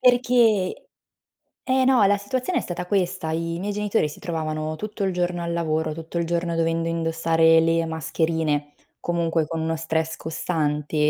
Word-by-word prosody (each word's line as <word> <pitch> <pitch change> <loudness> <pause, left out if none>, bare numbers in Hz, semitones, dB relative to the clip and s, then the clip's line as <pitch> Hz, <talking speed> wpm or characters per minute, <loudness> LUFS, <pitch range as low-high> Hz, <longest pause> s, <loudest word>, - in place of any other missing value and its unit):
Perché 240 -6 +3 0.8
eh, 260 0 +2
no, 260 -5 +5
la 205 +1 +4
situazione 255 - -1
è - - -2
stata 180 0 -5
questa: 180 -3 0
i 165 +1 -2
miei 200 +3 -2
genitori 210 -4 0
si 150 - -11
trovavano 155 -2 -3
tutto 210 +2 -4
il 190 - 0
giorno 175 -1 -1
al 170 - -2
lavoro, 160 -2 0
tutto 165 +2 -5
il 170 - 0
giorno 170 0 -1
dovendo 165 0 0
indossare 165 0 +3
le 165 0 +2
mascherine, 160 -2 -1 0.3
comunque, 165 -2 0
con 165 +1 -3
uno 160 0 -1
stress 160 0 -1
costante, 150 -2 -2
165 Hz, 160 wpm, -24 LUFS, 160-185 Hz, 0.8 s, no